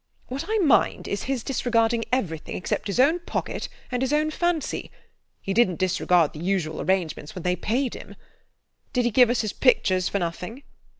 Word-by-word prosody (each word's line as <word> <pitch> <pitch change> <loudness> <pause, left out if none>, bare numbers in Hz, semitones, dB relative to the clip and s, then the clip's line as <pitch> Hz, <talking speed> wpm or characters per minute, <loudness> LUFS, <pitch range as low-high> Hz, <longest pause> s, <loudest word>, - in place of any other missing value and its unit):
What 260 +2 -4
I 440 - +2
mind 315 - +3
is 200 - -3
his 260 -4 -1
disregarding 230 -3 +1
everything 170 -11 -2
except 180 - -2
his 200 +4 -2
own 305 +7 +4
pocket 345 - -4 0.2
and 250 0 -1
his 265 +1 0
own 305 +1 +2
fancy. 345 -2 -1 0.5
He 195 - -2
didn't 200 -5 +3
disregard 180 -3 +2
the 150 - -8
usual 170 -3 -1
arrangements 170 -4 -1
when 180 - -6
they 180 0 +1
paid 240 +8 -1
him. - - -10 0.8
Did 250 -2 +1
he 240 - +2
give 245 +1 +6
us 245 - +2
his 215 -3 -3
pictures 185 -8 +3
for - - -1
nothing? 180 +8 -4
225 Hz, 180 wpm, -25 LUFS, 180-260 Hz, 0.8 s, give